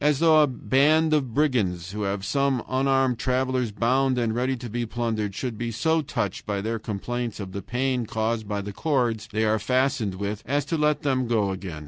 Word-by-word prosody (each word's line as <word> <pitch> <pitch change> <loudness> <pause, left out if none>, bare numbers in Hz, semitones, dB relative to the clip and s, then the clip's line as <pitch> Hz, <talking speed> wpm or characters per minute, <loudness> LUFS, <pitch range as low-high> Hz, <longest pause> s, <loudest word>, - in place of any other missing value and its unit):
As 150 -1 +3
though 160 0 +5
a 150 - +5
band 150 +5 +3
of 135 -5 +1
brigands, 100 - +1
who 105 +1 -5
have 100 -1 -2
some 140 0 +1
unarmed 135 -2 +2
travelers 130 -2 0
bound 125 +5 +1
and 115 -2 0
ready 130 +2 0
to 120 0 -7
be 120 +2 -2
plundered, 110 -4 -2
should 120 -5 -4
be 120 0 -2
so 160 +8 +1
touched 110 - -3
by 100 -1 -1
their 110 +3 -2
complaints 115 +3 -4
of 95 -2 -6
the 100 - -5
pain 125 +2 -1
caused 110 0 -1
by 100 -1 -2
the 100 0 -6
cords 120 -4 0
they 110 +1 +1
are 110 0 +2
fastened 125 -5 0
with 100 +2 -3
as 140 +1 0
to 155 - -1
let 150 -1 +1
them 130 -3 +1
go 105 -4 +1
again. 95 -4 -6
120 Hz, 205 wpm, -25 LUFS, 105-135 Hz, -, though